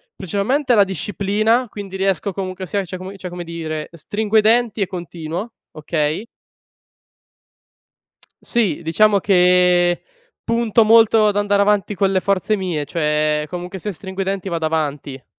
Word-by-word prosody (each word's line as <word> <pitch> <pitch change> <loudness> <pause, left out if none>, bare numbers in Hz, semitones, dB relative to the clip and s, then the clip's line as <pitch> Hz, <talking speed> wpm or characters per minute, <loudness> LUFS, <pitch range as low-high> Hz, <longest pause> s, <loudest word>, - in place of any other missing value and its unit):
principalmente 230 - 0
la 205 -3 +5
disciplina, 205 - 0
quindi 200 -2 -7
riesco 195 0 0
comunque 185 0 -5
sia 200 +2 -2
cioè 185 - -7
come 190 +2 -9
cioè 185 - -7
come 175 0 -6
dire, 160 -2 -5
stringo 205 +6 -1
i - - +7
denti 225 0 +2
e 195 - +1
continuo, 175 +3 -6 0.2
okay 155 +4 -2 2.2
Sì, 210 - 0
diciamo 200 +6 +3
che, 180 -2 +3 0.4
punto 230 -1 +2
molto 225 0 +5
ad 205 -1 0
andare 205 0 +2
avanti 205 -1 +1
con 195 0 +1
le 190 - +2
forze 200 +2 0
mie, 175 -6 -2
cioè 150 -1 0
comunque 180 +2 -6
se 205 +4 -4
stringo 190 +1 -7
i - - +1
denti 195 0 -3
vado 165 -2 -2
avanti. 145 -4 -3
190 Hz, 150 wpm, -19 LUFS, 170-205 Hz, 2.2 s, i